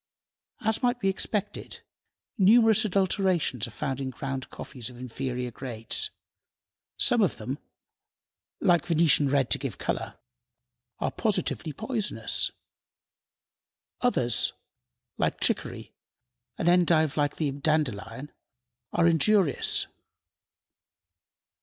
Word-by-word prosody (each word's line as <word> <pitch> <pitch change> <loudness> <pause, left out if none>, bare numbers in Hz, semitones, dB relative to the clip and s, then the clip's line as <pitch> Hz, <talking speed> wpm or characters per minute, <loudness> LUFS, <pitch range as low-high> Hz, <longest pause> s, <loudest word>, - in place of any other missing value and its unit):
As 220 -1 0
might 245 0 +1
be 195 - +1
expected, 205 +1 -3 0.5
numerous 220 +1 +6
adulterations 185 - +1
are - - -9
found 135 +3 -3
in 135 - -2
ground 135 0 -5
coffees 125 -4 -8
of 125 - -13
inferior 125 0 -4
grades. 115 -2 -3 0.9
Some - - +4
of - - +2
them, - - -5 1.0
like 175 -1 +3
venetian 160 -4 +4
red 135 -2 +1
to - - +4
give 130 -8 -4
color, - - -3 0.8
are - - -1
positively 195 -6 -1
poisonous. 215 - -1 1.5
Others, 125 - +2 0.7
like - - 0
chicory, - - -1 0.6
an 170 - -1
endive 170 -4 +4
like 145 -1 +1
the 150 -3 -1
dandelion, 140 -3 -1 0.6
are 170 - +3
injurious. 170 0 +3
155 Hz, 100 wpm, -27 LUFS, 130-195 Hz, 1.5 s, numerous